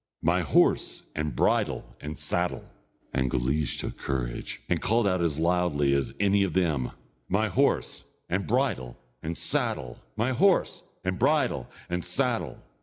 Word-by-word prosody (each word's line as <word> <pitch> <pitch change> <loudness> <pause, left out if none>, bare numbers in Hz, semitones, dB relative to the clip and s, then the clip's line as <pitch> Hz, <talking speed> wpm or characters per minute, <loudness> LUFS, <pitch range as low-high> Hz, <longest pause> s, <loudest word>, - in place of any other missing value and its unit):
My 85 +3 +3
horse, 80 - +2
and 75 -1 -2
bridle, - - +1
and 75 0 -6
saddle!" - - -1 0.5
and 65 -1 +1
Guleesh 65 +4 0
took - - -4
courage, 60 -3 -3
and 85 - 0
called 115 +2 +2
out 90 -2 +2
as 80 -4 +1
loudly 85 -4 +2
as 70 -1 0
any 100 0 +3
of 95 - +1
them: 80 -9 +1 0.4
"My 105 +3 +2
horse, - - +1 0.2
and 95 -1 -1
bridle, 65 -3 0 0.2
and 80 +2 -4
saddle! 65 -3 0 0.2
My 115 +4 +1
horse, 190 +8 +3 0.2
and 95 0 -1
bridle, 140 - +2 0.2
and 90 0 -2
saddle!" - - -1
85 Hz, 145 wpm, -27 LUFS, 70-95 Hz, 0.5 s, My